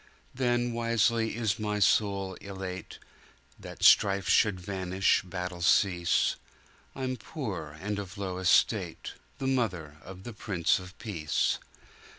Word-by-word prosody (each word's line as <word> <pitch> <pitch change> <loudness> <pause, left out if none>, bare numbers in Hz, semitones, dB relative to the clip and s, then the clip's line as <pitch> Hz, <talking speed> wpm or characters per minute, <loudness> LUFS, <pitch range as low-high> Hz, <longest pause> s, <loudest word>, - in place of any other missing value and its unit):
"Then 120 -1 0
wisely 115 -1 +1
is 110 -3 -1
my 105 -1 -1
soul 100 -1 +2
elate, 95 -3 -7 0.6
That - - -9
strife 100 -1 +5
should 105 -4 +3
vanish, 95 +1 +1
battle 90 -1 -6
cease. 90 -1 +3 0.6
I'm 130 -1 -3
poor 100 - -6
and 105 +3 -3
of 95 -2 -7
a - - -6
low 95 -2 -3
estate, 95 -1 +2 0.2
The 135 - -4
mother 95 - -1
of 95 0 -11
the 120 - -7
Prince 95 -6 0
of 90 +1 -12
Peace. 80 -9 -1
100 Hz, 130 wpm, -29 LUFS, 90-115 Hz, 0.6 s, strife